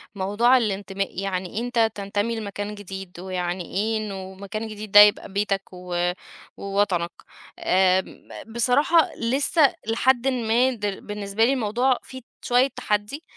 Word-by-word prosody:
موضوع 210 Hz, +7 st, +3 dB
الانتماء، 195 Hz, -3 st, -2 dB
يعني 190 Hz, +1 st, -3 dB
أنت 235 Hz, -2 st, +1 dB
تنتمي 205 Hz, +3 st, -2 dB
لمكان 205 Hz, 0 st, -5 dB
جديد 190 Hz, -3 st, -9 dB
ويعني 180 Hz, -1 st, -3 dB
إيه 220 Hz, +3 st, 0 dB
إنه 195 Hz, -3 st, -6 dB
مكان 200 Hz, +3 st, -6 dB
جديد 215 Hz, -1 st, -8 dB
ده 205 Hz, -, +9 dB
يبقى 205 Hz, -1 st, +6 dB
بيتك 200 Hz, -1 st, 0 dB
و 180 Hz, -1 st, -2 dB, 0.5 s
ووطنك، 195 Hz, -4 st, 0 dB, 0.5 s
آمم، 185 Hz, 0 st, +1 dB, 0.3 s
بصراحة 285 Hz, +7 st, +3 dB
لسّه 275 Hz, +6 st, +2 dB
لحدٍ 245 Hz, +3 st, +2 dB
ما 245 Hz, 0 st, +2 dB
د 210 Hz, -4 st, -5 dB
بالنسبة 205 Hz, +1 st, -1 dB
لي 265 Hz, -, +2 dB
الموضوع 245 Hz, +2 st, +1 dB
فيه 260 Hz, 0 st, -10 dB, 0.2 s
شوية 250 Hz, +2 st, +3 dB
تحدي، 210 Hz, +4 st, -3 dB
205 Hz, 130 wpm, -24 LUFS, 195-235 Hz, 0.5 s, ده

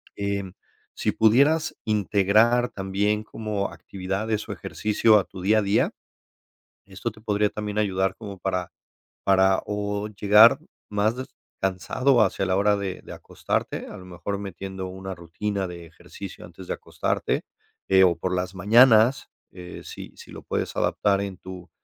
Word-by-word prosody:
em, 100 Hz, -2 st, -3 dB, 0.4 s
si -, -, -1 dB
pudieras 140 Hz, +9 st, +3 dB
integrar 110 Hz, +3 st, +3 dB
también 100 Hz, +2 st, -1 dB
como 105 Hz, -2 st, -4 dB
actividades 100 Hz, +3 st, -4 dB
o -, -, -5 dB
ejercicio 105 Hz, +1 st, +2 dB
a 100 Hz, -, +2 dB
tu 95 Hz, 0 st, -11 dB
día 105 Hz, +4 st, +3 dB
a -, -, +1 dB
día, 100 Hz, +2 st, +2 dB, 0.9 s
esto 95 Hz, 0 st, -5 dB
te 110 Hz, -, -18 dB
podría 105 Hz, -1 st, +1 dB
también 105 Hz, -1 st, -5 dB
ayudar 95 Hz, -2 st, 0 dB
como 100 Hz, -4 st, -9 dB
para 90 Hz, -2 st, -2 dB, 0.5 s
para 95 Hz, -1 st, +4 dB
o 105 Hz, 0 st, -3 dB
llegar 105 Hz, +2 st, +6 dB, 0.3 s
más 105 Hz, +2 st, +1 dB
des 130 Hz, -, -5 dB, 0.3 s
cansado 120 Hz, +7 st, +2 dB
hacia 95 Hz, -, -1 dB
la 95 Hz, -, +1 dB
hora 105 Hz, +1 st, +3 dB
de 95 Hz, -2 st, -4 dB
de -, -, -9 dB
acostarte, -, -, -3 dB
a -, -, -9 dB
lo 90 Hz, -, -12 dB
mejor 90 Hz, +3 st, -5 dB
metiendo 95 Hz, -1 st, -6 dB
una 95 Hz, +1 st, -7 dB
rutina 95 Hz, +3 st, -3 dB
de 85 Hz, -1 st, -9 dB
ejercicio 90 Hz, +3 st, -10 dB
antes 85 Hz, +2 st, -12 dB
de -, -, -1 dB
acostarte, -, -, -2 dB, 0.5 s
eh, 95 Hz, 0 st, +6 dB
o 85 Hz, -, +3 dB
por 90 Hz, +2 st, -2 dB
las 90 Hz, +1 st, -3 dB
mañanas, 115 Hz, +5 st, +5 dB, 0.2 s
eh, 90 Hz, -1 st, -10 dB
sí -, -, -9 dB
sí -, -, -13 dB
lo -, -, -9 dB
puedes -, -, -3 dB
adaptar 100 Hz, -1 st, +1 dB
en 100 Hz, -3 st, -5 dB
tu 90 Hz, -2 st, -10 dB
100 Hz, 155 wpm, -25 LUFS, 95-105 Hz, 0.9 s, llegar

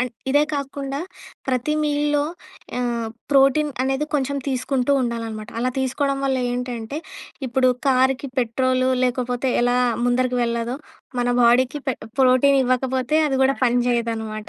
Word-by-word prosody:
And 250 Hz, -1 st, -2 dB, 0.2 s
ఇదే 290 Hz, +2 st, +4 dB
కాకుండా 275 Hz, 0 st, -4 dB, 0.5 s
ప్రతి 255 Hz, +4 st, 0 dB
మీల్‌లో 295 Hz, 0 st, +1 dB, 0.6 s
ఆహ్, 235 Hz, -2 st, -1 dB, 0.2 s
ప్రోటీన్ 280 Hz, +2 st, +4 dB
అనేది 270 Hz, +3 st, 0 dB
కొంచెం 280 Hz, 0 st, 0 dB
తీసుకుంటూ 260 Hz, +1 st, 0 dB
ఉండాలనమాట. 225 Hz, -3 st, -4 dB
అలా 255 Hz, +1 st, +1 dB
తీసుకోడం 275 Hz, +1 st, 0 dB
వల్ల‌ 265 Hz, -1 st, +1 dB
ఏంటంటే 245 Hz, +2 st, -4 dB, 0.5 s
ఇప్పుడు 255 Hz, +1 st, +2 dB, 0.2 s
కార్‌కి 265 Hz, +1 st, +2 dB
పెట్రోలు 255 Hz, +2 st, +1 dB, 0.2 s
లేకపోతే 250 Hz, 0 st, -1 dB
ఎలా 245 Hz, 0 st, +2 dB, 0.3 s
ముందరికి 250 Hz, 0 st, +1 dB
వెళ్ళదో, 235 Hz, +2 st, -1 dB, 0.4 s
మన 245 Hz, -, 0 dB
బాడీకి 255 Hz, +4 st, +3 dB
పె 260 Hz, -, +1 dB, 0.3 s
ప్రోటీనివ్వకపోతే 260 Hz, +1 st, +3 dB
అది 270 Hz, -2 st, 0 dB
గూడా 270 Hz, +1 st, +2 dB
పని 245 Hz, 0 st, +3 dB
చేయదనమాట. 225 Hz, -3 st, -2 dB
255 Hz, 125 wpm, -22 LUFS, 245-275 Hz, 0.6 s, ఇదే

